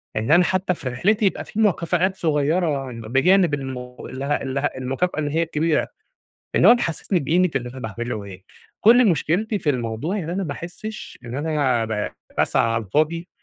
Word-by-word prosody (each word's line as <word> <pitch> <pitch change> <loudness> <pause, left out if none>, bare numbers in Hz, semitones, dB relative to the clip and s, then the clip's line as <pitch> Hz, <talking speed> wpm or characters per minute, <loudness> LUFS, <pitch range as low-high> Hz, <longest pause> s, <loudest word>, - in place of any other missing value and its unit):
إن 110 +5 -1
أنا 175 +3 +7
حتى 185 +1 0
في 135 -6 -5
رحلتي 205 - +1
يبقى 195 - 0
في 215 - -6
مكافآت 185 -2 +2
صغيرة 150 -4 0
بجانب 135 - +2
الم 135 -2 -3 0.2
ال 130 +1 -7
ال 140 -1 -1
المكافأة 135 +5 -1
اللي 145 -1 -1
هي 165 +2 +2
الكبيرة، 160 -1 0 0.7
اللي - - +6
هو - - +9
تحسسني 180 -4 -1
بقيمة 175 +6 +2
اللي 125 -2 -2
أنا 130 - -10
باعمله 110 -1 -4
إيه، 95 -1 -11 0.4
كل 235 +1 +6
مشكلتي 175 - 0
في 150 - 0
الموضوع 125 - -2
يعني 170 -6 -4
إن - - -2
أنا 195 +1 -1
ما 150 - -3
أحسش 180 +8 -8
إن 120 0 -7
أنا 145 -6 +1
ب 110 -2 -2 0.3
باسعى 115 - +2
على 115 -1 -1
الفاضي 155 - 0
150 Hz, 180 wpm, -22 LUFS, 130-180 Hz, 0.7 s, هو